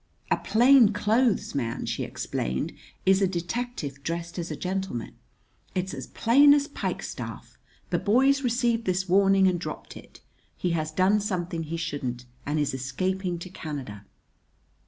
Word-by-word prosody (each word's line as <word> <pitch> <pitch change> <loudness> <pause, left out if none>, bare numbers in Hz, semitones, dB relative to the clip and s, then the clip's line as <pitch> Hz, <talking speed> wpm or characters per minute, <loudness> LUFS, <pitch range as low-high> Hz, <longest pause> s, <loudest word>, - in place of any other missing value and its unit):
"A - - +4
plain 240 -1 +5
clothes 220 +3 +1
man," 120 -4 -2
she - - -2
explained, 65 +1 -3 0.3
"is 190 +1 +4
a 195 - +4
detective 175 - -4
dressed 170 +3 -4
as 170 - -4
a - - -3
gentleman. 185 - -3 0.6
It's 190 +1 -2
as - - -6
plain 285 +5 +6
as 290 0 +1
pikestaff! 295 - -5 0.3
The - - +2
boy's 270 +6 +3
received 235 -2 +1
this 185 +1 0
warning 195 +1 +5
and 180 -2 +1
dropped - - -7
it. - - -13 0.4
He 180 - -1
has 155 -2 -1
done 185 +6 +3
something 175 -5 -2
he 165 +2 -4
shouldn't 135 -7 -4 0.2
and 150 +1 0
is 145 -2 0
escaping 180 +7 -2
to 170 +2 -8
Canada!" 135 - -6
185 Hz, 150 wpm, -26 LUFS, 160-215 Hz, 0.6 s, plain